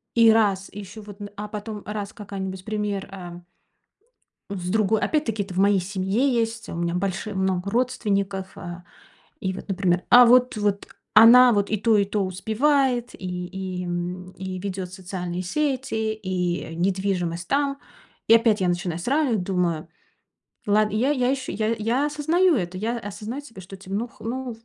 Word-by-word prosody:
и 230 Hz, -1 st, +7 dB
раз, 200 Hz, -4 st, +2 dB
и 205 Hz, -, -8 dB
ещё 205 Hz, +2 st, -9 dB
вот, 205 Hz, -1 st, -12 dB
н 205 Hz, -, -6 dB
а 210 Hz, +1 st, -4 dB
потом 210 Hz, 0 st, -6 dB
раз 205 Hz, -1 st, -5 dB
какая-нибудь 190 Hz, -3 st, -6 dB
пример, 210 Hz, -2 st, -2 dB
эм. 175 Hz, -2 st, -9 dB, 1.1 s
С 180 Hz, -3 st, -4 dB
другой 215 Hz, +1 st, +2 dB
Опять-таки 230 Hz, -9 st, 0 dB
это 190 Hz, -2 st, -9 dB
в -, -, -5 dB
моей 200 Hz, 0 st, +4 dB
семье 195 Hz, +8 st, 0 dB
есть, 230 Hz, -1 st, -1 dB
у -, -, -5 dB
меня 170 Hz, 0 st, -1 dB
больши 190 Hz, +3 st, -2 dB
много 190 Hz, 0 st, 0 dB
родственников. 200 Hz, -5 st, -1 dB
Э, 175 Hz, 0 st, -8 dB, 0.6 s
и 190 Hz, 0 st, -2 dB
вот, 195 Hz, -, -9 dB
например, 180 Hz, -2 st, +1 dB
а 245 Hz, 0 st, +9 dB
вот 250 Hz, 0 st, +5 dB
вот 205 Hz, -1 st, -1 dB, 0.3 s
она 240 Hz, +3 st, +9 dB
вот 205 Hz, -1 st, +1 dB
и 215 Hz, -, +1 dB
то, 220 Hz, +1 st, +3 dB
и 200 Hz, -, +4 dB
то 200 Hz, 0 st, -1 dB
успевает, 245 Hz, +6 st, +1 dB
и 180 Hz, -1 st, -5 dB
и, 185 Hz, -1 st, -5 dB
м, 180 Hz, +1 st, -4 dB
и 185 Hz, -1 st, -6 dB
ведёт 190 Hz, -1 st, -4 dB
социальные 180 Hz, -1 st, -5 dB
сети, 255 Hz, -2 st, -1 dB
и 180 Hz, -5 st, -3 dB
недвижимость 180 Hz, -2 st, -1 dB
там. 280 Hz, 0 st, +1 dB, 0.5 s
И -, -, +7 dB
опять 225 Hz, -2 st, +3 dB
я 185 Hz, -, +2 dB
начинаю 175 Hz, -1 st, -1 dB
сравнивать, 245 Hz, -, +1 dB
думаю: 175 Hz, -4 st, -1 dB, 0.8 s
"Лад". 210 Hz, +1 st, +3 dB
И 215 Hz, -, -1 dB
я 260 Hz, +6 st, +2 dB
я 255 Hz, -4 st, +1 dB
еще 265 Hz, -1 st, -2 dB
я 220 Hz, +1 st, 0 dB
я 235 Hz, +6 st, +1 dB
осознаю 315 Hz, +4 st, +2 dB
это. 180 Hz, -5 st, -2 dB
Я 230 Hz, +4 st, -1 dB
осознаю 215 Hz, +4 st, -6 dB
себе, 230 Hz, -9 st, -12 dB
что, 195 Hz, +2 st, -11 dB
типа: 190 Hz, 0 st, -9 dB
"Ну 230 Hz, +4 st, -1 dB
х -, -, -24 dB
ну 245 Hz, 0 st, -4 dB
205 Hz, 175 wpm, -24 LUFS, 185-230 Hz, 1.1 s, а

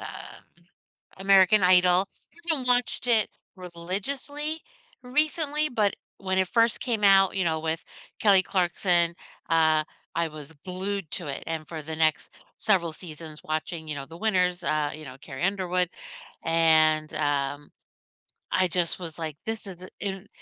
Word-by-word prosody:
um, -, -, -6 dB, 1.1 s
American 195 Hz, +1 st, +5 dB
Idol. 180 Hz, +1 st, +5 dB
I -, -, -20 dB, 0.2 s
haven't 260 Hz, -5 st, -3 dB
watched 245 Hz, 0 st, +1 dB
it 225 Hz, -4 st, +3 dB, 0.3 s
religiously 205 Hz, -, -4 dB, 0.4 s
recently, 300 Hz, +3 st, 0 dB
but 215 Hz, -5 st, +1 dB, 0.2 s
when 190 Hz, -1 st, -1 dB
it 190 Hz, 0 st, +2 dB
first 230 Hz, +3 st, +2 dB
came 230 Hz, -5 st, 0 dB
out, 195 Hz, -1 st, +6 dB
you 190 Hz, -, +1 dB
know, 160 Hz, -2 st, 0 dB
with 160 Hz, +1 st, -2 dB, 0.4 s
Kelly 195 Hz, -3 st, +5 dB
Clarkson, 175 Hz, -2 st, +1 dB, 0.3 s
uh, 160 Hz, -1 st, +4 dB, 0.3 s
I 170 Hz, 0 st, +1 dB
was 150 Hz, -1 st, -10 dB
glued 190 Hz, -1 st, -4 dB
to 175 Hz, -, -4 dB
it, 140 Hz, -, -5 dB
and 160 Hz, -2 st, -3 dB
for 160 Hz, -2 st, -6 dB
the 160 Hz, +1 st, -6 dB
next 155 Hz, -1 st, +1 dB, 0.3 s
several 180 Hz, -6 st, +2 dB
seasons 155 Hz, -2 st, -9 dB
watching, 155 Hz, +1 st, -4 dB
you 150 Hz, -, -3 dB
know, 140 Hz, -1 st, -5 dB
the 165 Hz, +4 st, -12 dB
winners, 180 Hz, -4 st, +1 dB
uh, 150 Hz, -2 st, 0 dB
you 155 Hz, 0 st, -8 dB
know, 130 Hz, -2 st, -9 dB
Carrie 135 Hz, +1 st, -7 dB
Underwood, 185 Hz, -2 st, 0 dB, 0.6 s
and, 155 Hz, -1 st, +4 dB
um, 145 Hz, -1 st, -1 dB, 0.8 s
I 185 Hz, 0 st, +3 dB
just 175 Hz, 0 st, 0 dB
was 165 Hz, -3 st, -7 dB
like, 160 Hz, -3 st, -4 dB
"his 225 Hz, -1 st, -4 dB
is 180 Hz, -2 st, -9 dB
i" -, -, -8 dB
and, 195 Hz, 0 st, -4 dB
180 Hz, 155 wpm, -26 LUFS, 160-200 Hz, 1.1 s, out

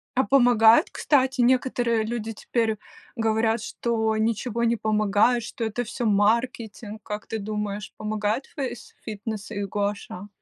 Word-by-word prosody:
А 260 Hz, -, +3 dB
помогает, 245 Hz, -, +5 dB
кстати? 265 Hz, -2 st, +1 dB
Некоторые 245 Hz, -2 st, +2 dB
люди 225 Hz, 0 st, -4 dB
теперь 220 Hz, 0 st, -1 dB, 0.4 s
говорят, 225 Hz, -1 st, +1 dB
что 220 Hz, -2 st, -1 dB
ничего 230 Hz, +1 st, -1 dB
не 235 Hz, 0 st, +3 dB
помогает, 215 Hz, +2 st, +2 dB
что 230 Hz, -, -6 dB
это 225 Hz, +2 st, -2 dB
всё 235 Hz, +1 st, -4 dB
маркетинг. 220 Hz, +1 st, 0 dB
Как 210 Hz, +1 st, -6 dB
ты 225 Hz, -, -3 dB
думаешь, 210 Hz, 0 st, -4 dB
помогает 215 Hz, +3 st, -1 dB
фейсфитнес 220 Hz, -5 st, -6 dB
и 205 Hz, -2 st, -3 dB
гуаша? 200 Hz, -1 st, -3 dB
220 Hz, 125 wpm, -25 LUFS, 210-240 Hz, 0.4 s, помогает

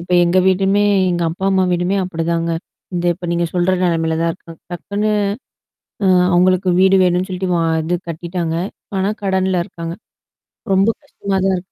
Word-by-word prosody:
இப்ப 180 Hz, +1 st, -6 dB
எங்க 175 Hz, +2 st, +2 dB
வீடுமே 195 Hz, +2 st, +3 dB, 0.3 s
எங்க 175 Hz, -1 st, -1 dB
அப்பா, 185 Hz, +3 st, -6 dB
அம்மா 190 Hz, -1 st, +3 dB
வீடுமே 180 Hz, +3 st, 0 dB
அப்டிதாங்க. 170 Hz, -1 st, -2 dB, 0.4 s
இந்த 175 Hz, 0 st, -2 dB
இப்ப 175 Hz, 0 st, -8 dB
நீங்க 170 Hz, 0 st, +1 dB
சொல்ற 180 Hz, +1 st, +1 dB
நெலமையில 165 Hz, -2 st, 0 dB
தான் 165 Hz, 0 st, +1 dB
இருக்கு 165 Hz, -1 st, -13 dB, 0.2 s
டக்குன்னு 205 Hz, +4 st, -2 dB, 0.9 s
அ -, -, +3 dB, 0.3 s
அவங்களுக்கு 185 Hz, +1 st, +3 dB
வீடு 190 Hz, 0 st, +5 dB
வேணும்னு 180 Hz, +1 st, +1 dB
சொல்ட்டு 185 Hz, 0 st, -3 dB
வ -, -, +2 dB, 0.2 s
இது 175 Hz, +3 st, -1 dB
கட்டிட்டாங்க. 170 Hz, 0 st, -3 dB, 0.3 s
இப்ப 195 Hz, -, -5 dB
ஆனா 195 Hz, +2 st, +1 dB
கடன்ல 190 Hz, -2 st, +1 dB
இருக்காங்க. 170 Hz, -3 st, -7 dB, 0.8 s
ரொம்ப 195 Hz, +3 st, +4 dB
கஷ்டமா 200 Hz, -8 st, -3 dB
தான் 190 Hz, -1 st, +2 dB
இருக்கு. 180 Hz, +1 st, -10 dB
180 Hz, 165 wpm, -18 LUFS, 170-190 Hz, 0.9 s, வீடு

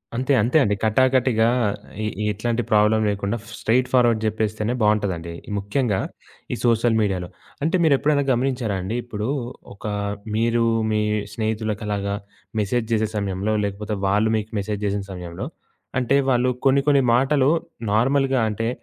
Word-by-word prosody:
అంతే, 130 Hz, +3 st, +1 dB
అంతే 120 Hz, +8 st, +2 dB
అండి. 105 Hz, -4 st, +1 dB
కటాకటిగా 125 Hz, 0 st, +3 dB, 0.6 s
ఎ -, -, -1 dB, 0.3 s
ఎట్లాంటి 115 Hz, +3 st, -1 dB
ప్రాబ్లమ్ 105 Hz, +1 st, +4 dB
లేకుండా, 100 Hz, +2 st, -2 dB, 0.2 s
స్ట్రెయిట్‌ఫార్వర్డ్ 125 Hz, -1 st, +3 dB
చెప్పేస్తేనే 110 Hz, +1 st, -1 dB
బావుంటదండి. 100 Hz, -6 st, 0 dB, 0.2 s
ముఖ్యంగా 100 Hz, +1 st, 0 dB, 0.5 s
ఈ -, -, 0 dB
సోషల్ 115 Hz, 0 st, +3 dB
మీడియాలో. 95 Hz, -4 st, -1 dB, 0.4 s
అంటే 165 Hz, +4 st, +1 dB
మీరు 155 Hz, -3 st, +5 dB
ఎప్పుడైనా 145 Hz, 0 st, +2 dB
గమనించారా 120 Hz, -4 st, 0 dB
అండి, 95 Hz, +5 st, -3 dB
ఇప్పుడు 105 Hz, -2 st, -4 dB, 0.5 s
ఒక 100 Hz, -, -13 dB, 0.5 s
మీరు 115 Hz, +1 st, +2 dB, 0.3 s
మీ 105 Hz, 0 st, +1 dB, 0.3 s
స్నేహితులకలాగా 105 Hz, -2 st, -2 dB, 0.4 s
మెసేజ్ 110 Hz, +3 st, 0 dB
చేసే 110 Hz, -1 st, +2 dB
సమయంలో, 100 Hz, +1 st, -1 dB
లేకపోతే 105 Hz, +2 st, -3 dB
వాళ్ళు 105 Hz, +3 st, +2 dB
మీకు 110 Hz, 0 st, -5 dB
మెసేజ్ 105 Hz, +1 st, -3 dB
చేసిన 100 Hz, 0 st, -1 dB
సమయంలో, 90 Hz, -2 st, -6 dB, 0.5 s
అంటే 130 Hz, +2 st, +2 dB
వాళ్ళు 125 Hz, 0 st, +3 dB, 0.2 s
కొన్ని, 135 Hz, +1 st, +4 dB
కొన్ని 140 Hz, -2 st, +5 dB
మాటలు 135 Hz, +2 st, +3 dB, 0.4 s
నార్మల్‌గా 135 Hz, +2 st, +2 dB
అంటే 115 Hz, +2 st, -2 dB
110 Hz, 130 wpm, -22 LUFS, 105-125 Hz, 0.6 s, మీరు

